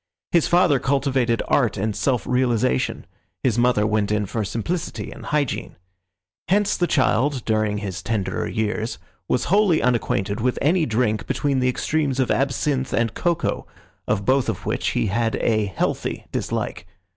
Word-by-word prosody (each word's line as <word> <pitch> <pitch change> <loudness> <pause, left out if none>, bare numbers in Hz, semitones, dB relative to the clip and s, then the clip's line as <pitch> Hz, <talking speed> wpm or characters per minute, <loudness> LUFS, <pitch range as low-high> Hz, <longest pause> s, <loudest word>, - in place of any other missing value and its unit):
His 170 -3 +3
father 175 -6 +4
cultivated 135 -4 +1
art 115 -7 +2
and 105 +1 -1
self 125 -7 0
realisation; 120 - +1 0.4
his 120 -3 +2
mother 120 -3 +3
went 105 -1 +1
in 105 -1 +1
for 110 +3 -2
simplicity 115 - -3
and - - -10
hygiene. 145 -4 -1 0.7
Hence 205 +2 +2
the 175 - +1
child, 135 -2 +1
during 110 -2 +1
his 95 -3 -4
tenderer 95 -4 -2
years, 110 +1 -2 0.3
was 125 - +1
wholly 200 -6 +4
unacquainted 110 -3 0
with 125 +1 0
any 160 +2 +2
drink 110 -2 0
between 140 -2 0
the 125 0 +2
extremes 140 +1 -1
of 130 - +1
absinth 135 0 0
and 115 -2 +1
cocoa, 170 -2 -1 0.4
of 100 - 0
both 130 0 +2
of - - -4
which - - -1
he - - +2
had 115 +3 0
a 110 -2 +1
healthy 100 - -2
dislike. - - -3
125 Hz, 155 wpm, -22 LUFS, 110-140 Hz, 0.7 s, father